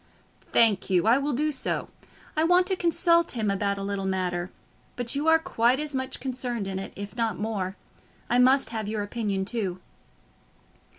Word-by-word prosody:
"Thank 215 -5 +4
you; 180 -2 +2
I 235 +4 +5
will 285 +1 -1
do 300 +5 0
so. 270 - -2 0.5
I 310 - +2
want 355 +2 +4
to 380 0 +1
consult 340 -1 +3
him 220 -4 0
about 200 0 -1
a 195 - -4
little 195 -1 -2
matter; 180 -2 -2 0.5
but 245 -1 -2
you 290 +3 -1
are 320 0 +7
quite 260 -7 +1
as 300 -1 -3
much 260 0 -3
concerned 245 -5 -3
in 190 -1 -3
it, 195 - -7
if 200 +2 -7
not 230 -2 -1
more. 205 -3 -3 0.5
I 245 - +2
must 260 0 +4
have 220 -2 -3
your 210 -1 -2
opinion 205 -3 -2
too." 195 -4 -2
230 Hz, 180 wpm, -26 LUFS, 200-275 Hz, 0.5 s, are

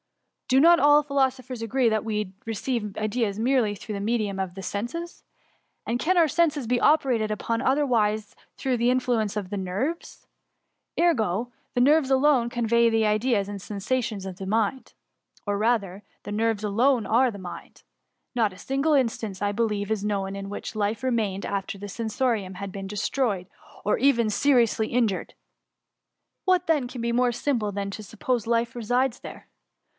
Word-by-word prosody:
Do 260 - +4
not 340 +3 +7
all 295 0 +6
philosophers 265 -3 -1
agree 240 +2 +1
that 220 -1 +1
we 210 -3 -3
receive 225 -1 -3
ideas 215 -1 -1
merely 240 -3 +2
through 210 +2 -7
the 200 - -4
medium 210 -2 -1
of 190 -2 -3
the 195 - -7
senses.*^ 245 - -5 0.6
And 235 +2 -1
can 360 +7 +1
our 335 -2 +6
senses 305 -3 +1
be 245 +1 +2
operated 255 -8 +3
upon 230 +2 -2
otherwise 230 -7 +1
than - - -27 0.2
through 260 -3 0
the 235 +1 +2
influence 240 -5 0
of 195 -3 -4
the 205 - -3
nerves? 200 - -4 0.7
Ergo, 240 - +1 0.2
the - - +2
nerves 285 +2 +4
alone 265 -3 +3
convey 235 -2 +2
ideas 215 -1 +1
and 200 -1 -6
sensations 210 +1 -2
to 190 -1 -5
the 190 +2 -8
mind 225 +5 -1 0.3
— - - -34
or 205 0 0
rather, 210 -3 0 0.2
the 205 - -5
nerves 220 0 0
alone 230 +4 +2
are 245 +3 +3
the 205 - -9
mind. 185 -2 -10 0.5
Not 225 -4 +2
a - - -14
single 275 +7 0
instance, 225 -7 0
I 205 0 +1
believe, 210 -1 -1
is 215 -2 -1
known 195 -2 -2
in 195 0 -6
which 205 - -6
life 210 +2 -1
remained 220 -6 -1
after 200 0 -3
the 205 +1 -7
sensorium 220 -2 -2
had 200 +1 -6
been 195 0 -6
destroyed, 205 -1 -1 0.4
or 210 - +2
even 235 -4 +3
seriously 235 -3 +3
injured. 230 -6 -1 1.1
What 370 -1 +2
then 300 -6 +2
can 245 -1 -7
be 235 0 0
more 245 0 +3
simple 235 -4 -1
than 200 0 -3
to 215 - -7
suppose 225 +3 -2
life 235 0 0
resides 245 +2 0
there - - -10
225 Hz, 170 wpm, -25 LUFS, 205-255 Hz, 1.1 s, not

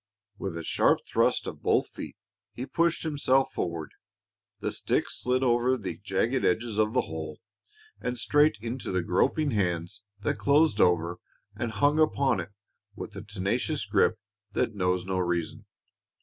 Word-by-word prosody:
With 95 -4 -4
a 85 - -5
sharp - - +3
thrust - - +2
of - - -7
both - - +2
feet, - - -8 0.4
he 125 - -5
pushed 170 +3 +1
himself 135 -4 +2
forward. 85 -3 -3 0.7
The - - -2
stick - - 0
slid 130 +1 0
over 125 +1 +3
the 95 -7 -5
jagged 110 +6 0
edges 110 +2 +1
of 110 +1 +2
the 130 - +3
hole 80 -1 -6 0.6
and 125 0 -3
straight 145 +1 +3
into 120 +4 -4
the 90 -1 0
groping 140 - +1
hands 90 -5 -1 0.2
that - - -1
closed 140 -6 +4
over 85 0 +2 0.4
and 120 - -3
hung 145 +8 +2
upon 140 -7 +3
it 85 - -5 0.5
with - - -7
the - - -8
tenacious 105 +8 -2
grip 105 +2 +2 0.4
that 115 - 0
knows 90 -2 0
no 95 0 -1
reason. 85 -2 -2
110 Hz, 155 wpm, -28 LUFS, 90-130 Hz, 0.7 s, closed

